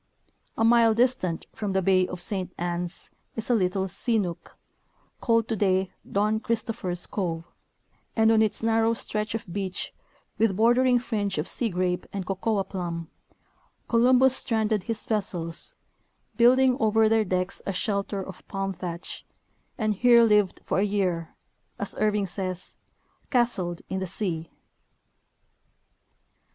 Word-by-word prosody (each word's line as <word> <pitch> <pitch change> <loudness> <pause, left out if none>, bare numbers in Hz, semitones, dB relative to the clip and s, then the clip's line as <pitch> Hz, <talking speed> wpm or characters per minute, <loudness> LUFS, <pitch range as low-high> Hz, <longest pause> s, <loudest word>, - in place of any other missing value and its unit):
A - - +1
mile 230 -1 +5
distant 235 -8 +1
from 205 -3 -3
the 190 - +2
bay 185 0 +3
of 180 - -6
Saint 185 -1 0
Anns 175 0 -4 0.2
is 225 +2 -2
a - - +5
little 190 -2 +1
sea 230 +5 +1
nook, 180 -5 -4 0.6
called 230 -2 +2
today 190 -4 +1 0.2
Don 210 +2 +1
Christopher's 220 -6 -2
cove, 165 -5 -3 0.7
and 220 0 +4
on 220 -1 +4
its 220 0 0
narrow 225 0 +2
stretch 215 -1 -3
of 225 - -4
beach, 190 -2 -3 0.5
with 220 -4 +3
bordering 245 +4 +4
fringe 210 -5 -2
of - - -2
sea 235 - 0
grape 180 -1 -1
and 195 -2 -4
cocoa 195 +2 0
plum, 170 -4 -5 0.8
Columbus 255 +2 +5
stranded 220 -3 +1
his 225 -1 -2
vessels, 185 - -3 0.6
building 255 +2 +5
over 220 -1 +3
their 220 0 +3
decks 185 -1 -2
a - - +1
shelter 200 0 -2
of 185 -1 -11
palm 195 0 -3
thatch, 175 -1 -6 0.5
and 215 -2 +1
here 235 +3 +6
lived 210 -4 +3
for - - 0
a - - +3
year, 185 -5 -1 0.4
as 200 - -3
Irving 210 -1 +2
says, 185 -1 -5 0.3
'* - - -40
castled 215 -10 0
in 190 - -3
the 190 - -3
sea." 170 -4 -3
205 Hz, 140 wpm, -26 LUFS, 185-225 Hz, 0.8 s, here